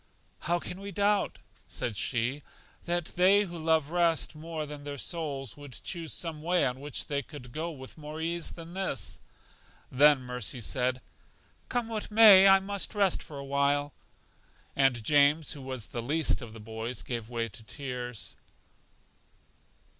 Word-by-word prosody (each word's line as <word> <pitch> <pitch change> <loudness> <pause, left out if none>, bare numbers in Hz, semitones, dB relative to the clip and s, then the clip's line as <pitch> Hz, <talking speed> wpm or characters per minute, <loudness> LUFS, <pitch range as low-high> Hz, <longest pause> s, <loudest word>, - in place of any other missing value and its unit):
How 175 +2 +1
can 180 +2 -7
we 200 0 -6
doubt, 205 +2 +1 0.3
said 115 - -3
she, 125 +6 0 0.4
that 175 -1 0
they 190 +3 +5
who 175 -3 -7
love 160 -2 +2
rest 170 -2 +2
more 160 0 -5
than 145 -1 -8
their 145 0 -5
souls 140 - -3
would 145 -3 -11
choose 170 -3 -4
some 160 -3 -2
way 175 -1 +2
on 125 0 -2
which 145 0 -4
they 140 -1 -1
could 130 -3 -11
go 160 +6 -3
with 135 -1 -10
more 150 +1 -7
ease 170 +1 -1
than 165 0 -10
this? 190 0 -2 0.7
Then 145 +1 +6
Mercy 125 -1 -4
said, 125 +2 0 0.7
Come 245 -2 -1
what 220 -2 -4
may, 210 -3 +9
I 195 0 +8
must 200 +2 -4
rest 200 -3 +2
for 145 - -9
a 140 - -6
while. 140 +1 +1 0.8
And 135 -4 +3
James, 145 +4 +4
who 145 - -6
was 130 -4 -4
the 120 - -5
least 150 +6 +1
of 115 -3 -9
the 115 - -10
boys, 110 +3 -5
gave 115 -3 -4
way 115 -1 -1
to 105 - -10
tears. 125 -1 -5
145 Hz, 160 wpm, -29 LUFS, 130-170 Hz, 0.8 s, may